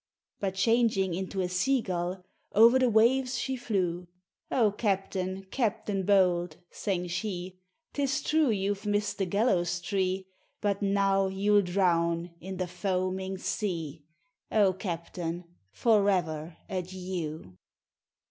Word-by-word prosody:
But 190 -2 -2
changing 215 -3 +2
into 190 +2 -3
a 180 - 0
sea 185 +10 +2
gull 180 -2 -3 0.3
Over 230 +5 +7
the 255 -1 +3
waves 250 +4 +3
she 265 - -2
flew. 180 -7 -2 0.4
"O 225 -5 +3
capitain, 195 -2 -2
captain 210 -5 -1
bold," 180 -5 +3
sang 185 -3 -2
she, 185 0 -4 0.3
"'Tis 275 -1 0
true 310 -3 +3
you've 200 -1 -1
missed 205 0 0
the 195 - 0
gallows 175 -4 +1
tree, 190 +1 -1 0.3
But 200 -1 0
now 195 -1 +2
you'll 205 +2 +3
drown 175 -2 +1
in 190 +1 -6
the 185 - -1
foaming 185 +1 -2
sea, 165 -7 -3 0.5
O 200 -3 +4
captain, 175 -1 -4 0.3
forever 180 - +1
adieu!" 180 - -5
190 Hz, 120 wpm, -29 LUFS, 180-205 Hz, 0.5 s, Over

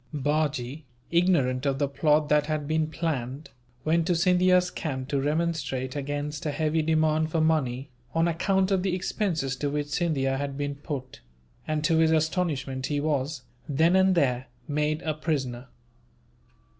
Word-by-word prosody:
Bajee, 145 -1 -1 0.3
ignorant 150 -7 +2
of 135 -1 +1
the 140 0 +1
plot 150 +2 +2
that 150 0 +3
had 155 -2 -2
been 155 0 +1
planned, 145 -4 -3 0.3
went 165 +1 +2
to 180 - +2
Scindia's 180 +1 +3
camp 130 -4 -4
to 140 -1 0
remonstrate 150 -4 -1
against 145 +1 -3
a - - +1
heavy 155 +2 0
demand 155 0 +2
for 160 - 0
money, 140 -4 0 0.2
on 165 +1 +3
account 190 +3 +1
of 190 -2 +2
the 185 -1 0
expenses 170 - -1
to 145 +2 -1
which 145 0 -2
Scindia 140 -5 0
had 140 -1 -3
been 145 0 -2
put; 140 -3 -7 0.5
and 155 -1 -1
to 165 0 +3
his 160 0 +4
astonishment 155 -5 0
he 145 -1 -1
was, 145 -2 -1 0.3
then 160 +5 +3
and 190 0 +4
there, 130 -5 +1 0.2
made 150 +1 0
a 155 - 0
prisoner. 135 -5 -3
150 Hz, 155 wpm, -27 LUFS, 140-165 Hz, 0.5 s, his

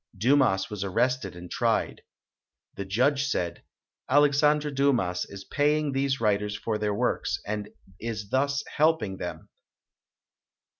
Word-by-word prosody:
Dumas 115 -4 +3
was 105 -2 -3
arrested 100 0 0
and 90 0 -10
tried. - - 0 0.7
The 100 - -6
judge 130 +8 +2
said, 90 -11 -2 0.5
"Alex 145 +1 +4
andre 150 0 +3
Dumas 125 -11 +1
is 100 -1 -9
paying 150 0 +1
these 135 0 0
writers 105 -1 +1
for 110 0 -2
their 105 -1 0
works 85 -4 0
and 105 0 -4 0.3
is 110 -3 -5
thus 140 +3 +1
helping 150 -11 +2
them. - - -7
115 Hz, 130 wpm, -27 LUFS, 100-140 Hz, 0.7 s, Alex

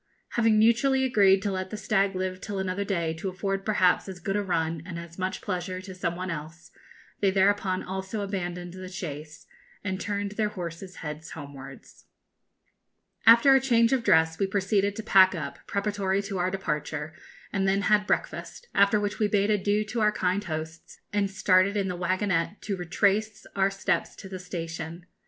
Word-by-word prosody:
Having 225 -2 +3
mutually 240 +5 +4
agreed 195 -6 +4
to 205 - 0
let 185 0 -3
the 215 - -5
stag 200 -2 +1
live 185 0 -3
till 205 -2 -5
another 190 +1 -1
day 170 -5 -1
to 165 +4 -4
afford 195 +1 -2
perhaps 195 -3 +2
as 185 -1 -8
good 195 +3 -2
a 205 - +1
run 165 -4 -1
and 170 -1 -7
as 170 +1 -9
much 185 +1 -2
pleasure 185 -1 -3
to 190 0 -9
some 175 -2 -2
one 185 +1 -4
else, 160 +2 -8 0.5
they 200 - +3
thereupon 190 -1 +2
also 190 +3 -4
abandoned 180 -3 -4
the 185 0 -8
chase, 155 -4 -7 0.4
and 190 -1 -3
turned 205 0 -2
their 210 0 0
horses' 180 -1 -7
heads 150 +1 -6
homewards. 140 -3 -11 1.2
After 235 +4 +8
a 270 - +6
change 235 -2 +3
of 255 -3 +1
dress, 160 -4 +3
we 195 - +2
proceeded 200 +1 +1
to 220 - -5
pack 190 -3 +6
up, 140 -4 -5
preparatory 200 -1 0
to 195 -2 -4
our 180 +1 +1
departure, 155 -5 -3 0.4
and 195 -1 +1
then 195 +1 +2
had 210 0 +3
breakfast, 485 - -3
after 200 +1 +4
which 205 0 -3
we 215 - +3
bade 205 0 +2
adieu 205 +1 +1
to 225 +2 -3
our 210 0 +4
kind 190 0 -1
hosts, 160 -1 -6
and 205 -1 +1
started 195 +1 +3
in 195 -2 0
the 180 - -3
waggonette 185 +1 0
to 205 - -2
retrace 200 +4 0
our 195 0 +3
steps 195 0 -1
to - - -10
the 190 -1 -7
station. 165 -1 -6
190 Hz, 185 wpm, -27 LUFS, 175-205 Hz, 1.2 s, After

